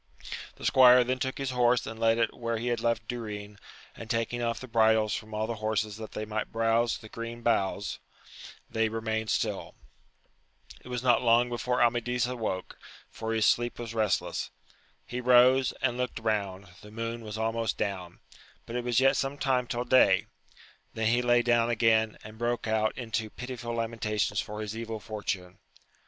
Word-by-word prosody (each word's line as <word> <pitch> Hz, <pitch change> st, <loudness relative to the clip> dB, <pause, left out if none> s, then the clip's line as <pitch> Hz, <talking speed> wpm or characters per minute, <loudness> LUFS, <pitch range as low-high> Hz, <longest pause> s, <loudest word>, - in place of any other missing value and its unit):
The -, -, -9 dB
squire 125 Hz, -2 st, +7 dB
then 130 Hz, +1 st, -1 dB
took 130 Hz, +1 st, -2 dB
his 135 Hz, -1 st, -2 dB
horse 125 Hz, -1 st, +3 dB
and 110 Hz, -, -7 dB
led 115 Hz, 0 st, +3 dB
it 115 Hz, -1 st, +1 dB
where 115 Hz, -1 st, -2 dB
he 120 Hz, +2 st, -2 dB
had 120 Hz, -1 st, 0 dB
left 115 Hz, -1 st, -1 dB
Durin, 105 Hz, -3 st, -6 dB, 0.4 s
and 115 Hz, -, -9 dB
taking 115 Hz, +1 st, -1 dB
off 115 Hz, -1 st, -1 dB
the 130 Hz, -, -8 dB
bridles 110 Hz, -2 st, +3 dB
from 110 Hz, 0 st, -5 dB
all 110 Hz, +1 st, 0 dB
the 115 Hz, 0 st, -4 dB
horses 110 Hz, -1 st, -1 dB
that 110 Hz, -1 st, -8 dB
they 110 Hz, -, -4 dB
might 110 Hz, 0 st, -3 dB
browze 115 Hz, +1 st, +2 dB
the 110 Hz, -, -12 dB
green 115 Hz, +1 st, -7 dB
boughs, 100 Hz, -3 st, 0 dB, 0.7 s
they 110 Hz, 0 st, 0 dB
remained 110 Hz, 0 st, -2 dB
stilL -, -, -1 dB, 1.1 s
It -, -, -13 dB
was 125 Hz, -1 st, -4 dB
not 125 Hz, -2 st, +4 dB
long 120 Hz, 0 st, +4 dB
before 125 Hz, +1 st, 0 dB
Amadis 120 Hz, 0 st, +1 dB
awoke, 115 Hz, -7 st, -4 dB, 0.3 s
for 110 Hz, 0 st, -4 dB
his 110 Hz, -1 st, +2 dB
sleep 120 Hz, +2 st, +2 dB
was 115 Hz, -1 st, -6 dB
restless: 110 Hz, -3 st, 0 dB, 0.6 s
he 125 Hz, +1 st, -4 dB
rose, 125 Hz, +1 st, +5 dB
and 125 Hz, -2 st, +1 dB
looked 125 Hz, 0 st, -2 dB
round: 100 Hz, -4 st, -2 dB
the 105 Hz, -, -12 dB
moon 115 Hz, +2 st, -4 dB
was 110 Hz, -1 st, -6 dB
almost 115 Hz, 0 st, -1 dB
down, 95 Hz, -4 st, -4 dB, 0.4 s
but 115 Hz, -, -7 dB
it 125 Hz, -, -1 dB
was 120 Hz, -1 st, +2 dB
yet 135 Hz, +1 st, +4 dB
some 135 Hz, +1 st, -2 dB
ti»"« 130 Hz, -2 st, +2 dB
till 120 Hz, 0 st, -2 dB
day; 105 Hz, -6 st, +5 dB, 0.7 s
then 110 Hz, 0 st, +1 dB
he 120 Hz, +1 st, +3 dB
lay 120 Hz, 0 st, +3 dB
down 120 Hz, -1 st, +3 dB
again, 110 Hz, -1 st, +2 dB
and 110 Hz, +1 st, -11 dB
broke 120 Hz, 0 st, -1 dB
or 110 Hz, 0 st, +2 dB, 0.4 s
pitiful 120 Hz, -1 st, -5 dB
lamentations 110 Hz, -3 st, -1 dB
for 105 Hz, +1 st, -6 dB
his 105 Hz, 0 st, -5 dB
evil 115 Hz, -1 st, -5 dB
fortune. 100 Hz, -4 st, -5 dB
115 Hz, 175 wpm, -29 LUFS, 110-120 Hz, 1.1 s, squire